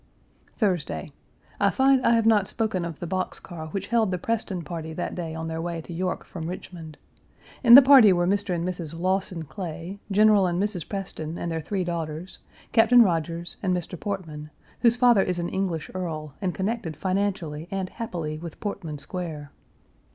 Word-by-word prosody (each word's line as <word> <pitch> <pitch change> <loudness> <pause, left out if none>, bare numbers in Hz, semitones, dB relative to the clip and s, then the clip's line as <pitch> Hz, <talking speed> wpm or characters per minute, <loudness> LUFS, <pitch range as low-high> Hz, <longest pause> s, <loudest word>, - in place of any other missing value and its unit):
Page - - -36
373 215 - +3
Thursday. 175 -6 -3 0.5
I - - +4
find 265 -1 +3
I 235 - +5
have 230 -1 +2
not 210 -3 +4
spoken 210 -6 -1
of 165 -3 -6
the - - -6
box 185 +2 -2
car 160 -3 -8
which 195 +4 -5
held 230 -3 +2
the 180 - -1
Preston 195 -3 -2
party 160 -1 -6
that 175 - -3
day 165 -3 -5
on 160 0 -4
their 160 0 -3
way 170 0 -3
to 165 +2 -8
York 180 +2 -2
from 165 -3 -6
Richmond. 165 -3 -8 0.7
In 235 -1 +10
the 275 - +11
party 260 -6 +8
were 175 -1 +2
Mr. 200 0 0
and 170 +1 -2
Mrs. 165 -3 -5
Lawson 185 -1 -1
Clay, 175 +4 -7
General 210 -1 +5
and 175 0 -1
Mrs. 200 -5 -2
Preston 175 -5 -5
and 170 - -3
their 160 0 -2
three 190 +4 -2
daughters, 170 0 -5 0.3
Captain 235 +1 +7
Rodgers, 170 -2 -2
and 185 -2 +1
Mr. 175 +1 -5
Portman, 160 -7 -5 0.3
whose 235 -1 +4
father 240 -4 +5
is 180 -2 -1
an 175 0 -2
English 180 -5 -2
earl, 155 -5 -4
and 185 -3 -1
connected 195 -4 -2
financially 185 -5 -2
and 190 -1 -3
happily 165 -9 -5
with 170 -1 -9
Portman 175 -7 -4
Square. 150 -1 -6
180 Hz, 190 wpm, -25 LUFS, 165-200 Hz, 0.7 s, the